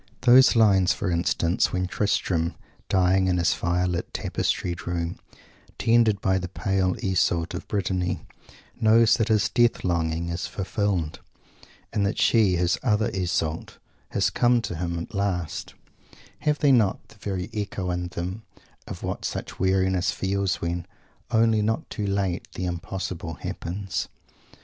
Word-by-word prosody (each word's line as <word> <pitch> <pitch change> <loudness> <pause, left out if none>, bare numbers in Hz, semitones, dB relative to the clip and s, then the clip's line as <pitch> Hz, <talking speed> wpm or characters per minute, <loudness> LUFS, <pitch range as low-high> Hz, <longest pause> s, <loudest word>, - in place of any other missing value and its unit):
Those 125 +1 +7
lines, 95 -5 +5
for 100 -3 -2
instance, 85 0 +1
when 90 0 0
Tristram, 90 -3 0 0.3
dying 95 0 +3
in 90 -1 +2
his 85 -1 +2
fire 90 +1 0
lit, 90 -1 -2
tapestried 85 -2 -2
room, 85 -1 -2 0.6
tended 115 -3 +3
by 95 -1 +2
the 90 - -4
pale 95 0 0
Iseult 85 -3 +1
of - - -6
Brittany, 90 -3 -1 0.5
knows 110 +1 +5
that 115 - +1
his 110 -3 +3
death 120 -1 +2
longing 85 -1 -1
is 85 +2 -3
fulfilled, 95 -5 -2 0.7
and 105 - +1
that 100 +2 0
she, 105 -6 +4
his 90 +1 +1
"other" 110 -4 +1
Iseult, 85 -4 -2 0.3
has - - +1
come 120 0 +3
to 90 - -4
him 85 0 -3
at 85 +7 -6
last 95 -5 -2 0.6
have 150 -1 +1
they 145 -2 +4
not 110 -7 +2
the 105 - -19
very 95 +1 -4
echo 100 -4 -3
in 90 0 -2
them 90 +4 -5 0.5
of - - -7
what - - -4
such - - -5
weariness 95 -1 +2
feels 95 +1 0
when, 85 +1 -3 0.4
only 115 -2 +3
not 110 +2 -1
too 105 -2 -3
late, 100 -3 -1
the 90 - -3
impossible 85 -1 -4
happens? 95 +6 -4
95 Hz, 145 wpm, -25 LUFS, 90-105 Hz, 0.7 s, Those